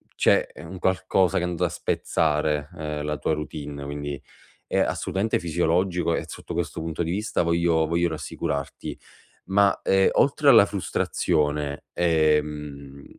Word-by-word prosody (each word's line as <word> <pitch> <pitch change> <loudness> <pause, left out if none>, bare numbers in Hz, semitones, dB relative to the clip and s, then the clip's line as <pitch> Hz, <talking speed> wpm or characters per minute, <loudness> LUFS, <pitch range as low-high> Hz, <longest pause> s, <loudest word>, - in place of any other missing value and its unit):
c'è, - - +3
ehm, 80 - -10
un 95 - -7
qualcosa 95 0 +2
che 90 - 0
è - - +1
andato 85 -2 -1
a - - 0
spezzare, 75 -1 0
uhm, 75 -3 -5
la 75 0 -2
tua 75 - 0
routine, 75 -2 -5
quindi, 70 0 -5 0.4
è - - 0
assolutamente 100 +4 0
fisiologico 85 +1 +1
e - - -2
sotto - - -8
questo 80 -3 -3
punto 80 +1 -3
di 80 - -2
vista 105 +5 -1
voglio 85 -1 +2
voglio 85 +2 +1
rassicurarti. 70 -3 -4 0.5
Ma, 100 0 +3
ehm, 95 0 +4
oltre - - +3
alla - - +8
frustrazione, 75 -3 -1
ehm, 75 -4 0
80 Hz, 145 wpm, -25 LUFS, 75-85 Hz, 0.5 s, alla